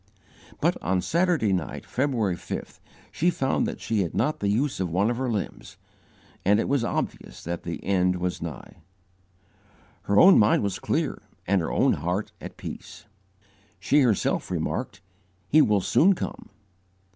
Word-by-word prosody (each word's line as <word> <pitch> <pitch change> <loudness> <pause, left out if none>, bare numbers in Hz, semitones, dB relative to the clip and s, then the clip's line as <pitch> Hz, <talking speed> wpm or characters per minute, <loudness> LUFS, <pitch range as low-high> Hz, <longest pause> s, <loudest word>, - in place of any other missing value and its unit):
But, - - +1
on 90 +3 0
Saturday 170 - +1
night, 90 -5 -3
February 120 -8 0
5th, - - -7 0.3
she 175 - +1
found 135 -6 0
that - - -5
she 110 -2 -1
had 85 - -3
not 155 - 0
the 100 - 0
use 130 +5 0
of 95 -2 -1
one 100 +7 +1
of 120 - -3
her 130 0 -1
limbs, 105 -4 -4 0.7
and 105 +3 +4
it - - 0
was 140 -3 +1
obvious - - -4
that 85 0 -4
the 85 - -6
end 90 -2 +2
was 90 0 -3
nigh. 80 -5 -8 1.3
Her 100 - +5
own 190 +1 +8
mind 105 0 +4
was 100 -2 -2
clear - - -1 0.2
and 100 0 +2
her 80 - -3
own - - +3
heart 90 +7 -2
at - - -9
peace. - - -9 0.7
She 145 - +3
herself 115 -7 +1
remarked, 85 - -3 0.5
"He 155 +7 +5
will 105 -7 +3
soon 190 - +4
come." - - -6
105 Hz, 160 wpm, -25 LUFS, 90-135 Hz, 1.3 s, own